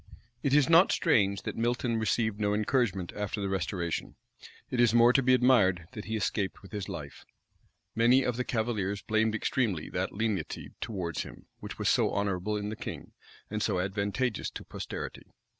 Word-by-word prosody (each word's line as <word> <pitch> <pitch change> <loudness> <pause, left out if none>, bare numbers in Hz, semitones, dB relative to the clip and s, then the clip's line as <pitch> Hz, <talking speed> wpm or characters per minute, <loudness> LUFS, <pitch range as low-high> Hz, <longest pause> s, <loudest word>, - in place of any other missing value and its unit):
It 140 0 +2
is 150 -3 +5
not 170 +3 +6
strange 100 - +2
that - - -4
Milton 120 0 0
received 110 0 0
no 105 -1 +1
encouragement 105 -5 0
after 105 +1 -3
the 100 -1 -2
restoration: 90 -3 -2 0.6
it 125 - -1
is 120 -1 +4
more 120 +1 +6
to 135 - +4
be 130 0 +5
admired 105 -9 +4
that 105 - -7
he 110 - -3
escaped 100 -2 -2
with 95 - -13
his 105 -2 -4
life. 75 -4 -7 0.7
Many 120 +4 +4
of 125 - 0
the 125 - -1
cavaliers 110 -5 -1
blamed 110 0 +1
extremely 110 - -1
that - - -1
lenity 100 -7 -3
towards 90 -7 -3
him, - - -10
which - - -8
was - - -1
so - - +3
honorable 100 +1 -1
in 105 0 -3
the 110 - -4
king, - - -7 0.4
and 110 0 -2
so 100 -4 +1
advantageous 100 +5 -1
to - - -8
posterity. - - -7
105 Hz, 175 wpm, -29 LUFS, 95-120 Hz, 0.7 s, not